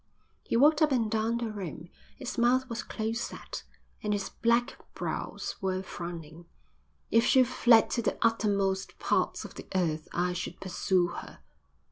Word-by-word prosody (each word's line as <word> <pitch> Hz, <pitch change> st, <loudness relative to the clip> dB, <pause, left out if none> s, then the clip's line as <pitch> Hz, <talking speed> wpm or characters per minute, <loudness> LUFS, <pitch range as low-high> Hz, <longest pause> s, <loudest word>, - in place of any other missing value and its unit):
He -, -, -1 dB
walked 295 Hz, +4 st, +5 dB
up 305 Hz, -2 st, +5 dB
and 230 Hz, -5 st, +1 dB
down 225 Hz, +1 st, +1 dB
the 235 Hz, -2 st, -2 dB
room. 175 Hz, -5 st, -6 dB, 0.3 s
His 260 Hz, -2 st, -5 dB
mouth 250 Hz, +2 st, +3 dB
was 235 Hz, -1 st, -3 dB
close 225 Hz, +1 st, -3 dB
set, -, -, -6 dB, 0.4 s
and 210 Hz, -1 st, 0 dB
his 200 Hz, -1 st, -2 dB
black 235 Hz, +1 st, +1 dB, 0.2 s
brows -, -, -4 dB
were 190 Hz, -1 st, -1 dB
frowning. 170 Hz, -2 st, -7 dB, 0.7 s
"If 230 Hz, -, +5 dB
she 260 Hz, 0 st, +6 dB
fled 240 Hz, -2 st, +5 dB
to 235 Hz, -, +1 dB
the 220 Hz, -, -1 dB
uttermost 200 Hz, -4 st, +1 dB
parts -, -, 0 dB
of -, -, -9 dB
the -, -, -10 dB
earth 160 Hz, -4 st, 0 dB
I 180 Hz, +1 st, 0 dB
should 180 Hz, -, -5 dB
pursue 185 Hz, -1 st, +1 dB
her." -, -, -9 dB
215 Hz, 160 wpm, -29 LUFS, 185-235 Hz, 0.7 s, she